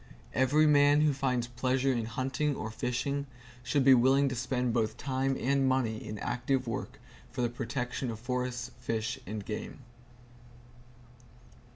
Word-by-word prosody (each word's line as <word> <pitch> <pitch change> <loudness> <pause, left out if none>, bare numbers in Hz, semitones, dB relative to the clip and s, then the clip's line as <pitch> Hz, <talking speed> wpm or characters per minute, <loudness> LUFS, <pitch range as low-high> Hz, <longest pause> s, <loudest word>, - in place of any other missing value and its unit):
Every 145 +4 +4
man 145 0 +5
who 150 -1 +3
finds 130 -3 0
pleasure 130 +2 0
in 115 -2 -1
hunting 130 +5 -1
or 110 - -5
fishing 140 +5 -2 0.3
should 130 +3 +1
be 135 - +9
willing 135 +3 +4
to 130 - -3
spend 125 0 -1
both 110 -2 0
time 135 0 -1
and 135 0 +2
money 120 -4 0
in 105 - -6
active 125 +4 -1
work 120 +3 -4 0.3
for 125 - -2
the 120 - +1
protection 125 +1 -3
of 110 -1 -5
forests, 125 0 -3
fish 115 -1 -2
and 105 0 -5
game. 110 +4 -6
125 Hz, 150 wpm, -30 LUFS, 120-135 Hz, 0.3 s, be